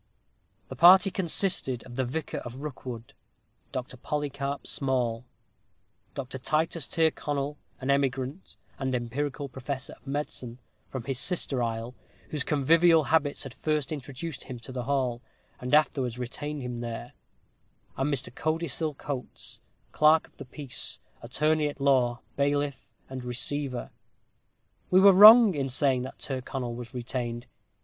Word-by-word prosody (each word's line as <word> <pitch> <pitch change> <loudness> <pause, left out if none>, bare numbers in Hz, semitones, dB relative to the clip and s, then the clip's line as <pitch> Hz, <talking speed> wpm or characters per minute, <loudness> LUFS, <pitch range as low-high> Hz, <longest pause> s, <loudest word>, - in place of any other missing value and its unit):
The - - -6
party 190 +3 +7
consisted 175 - 0
of 120 - -11
the 130 - 0
vicar 145 +5 -4
of 120 0 -8
Rookwood, 125 -5 -7 0.6
Dr. 130 0 -5
Polycarp 140 0 -3
Small; 125 -4 -1 0.9
Dr. 130 -1 -5
Titus 155 +3 0
Tyrconnel, 145 -3 -1 0.2
an 130 +1 0
emigrant, 135 +4 -1 0.2
and 130 -1 -1
empirical 140 +4 -3
professor 130 0 -5
of - - -19
medicine, 135 -4 -3 0.3
from 130 -3 -5
the 135 - -2
sister 135 -1 +2
isle, 115 +1 -3 0.4
whose 150 -3 -1
convivial 160 +3 +4
habits 145 -3 +2
had 135 -4 -8
first 150 +3 -1
introduced 145 0 -6
him 130 - -7
to 130 - -9
the 125 -2 -4
hall, 130 -3 0 0.4
and 125 - -5
afterwards 135 -5 +2
retained 145 +4 -5
him 125 -1 -4
there; 120 +1 -6 0.8
and 135 +3 0
Mr. 140 - -2
Codicil 155 0 -2
Coates, 135 -3 -7 0.3
clerk 155 +1 +5
of - - -26
the - - -8
peace, 135 0 -6 0.2
attorney 150 +5 +1
at 145 -1 -6
law, 125 -4 +2
bailiff, 145 0 -1 0.2
and 130 -1 -7
receiver. 125 +2 -2 1.0
We 185 - +6
were 195 0 +8
wrong 215 +2 +10
in 135 -3 -2
saying 130 0 +3
that 130 - -7
Tyrconnel 130 -2 -4
was 120 0 -8
retained. 120 -1 -4
135 Hz, 135 wpm, -28 LUFS, 125-150 Hz, 1.0 s, wrong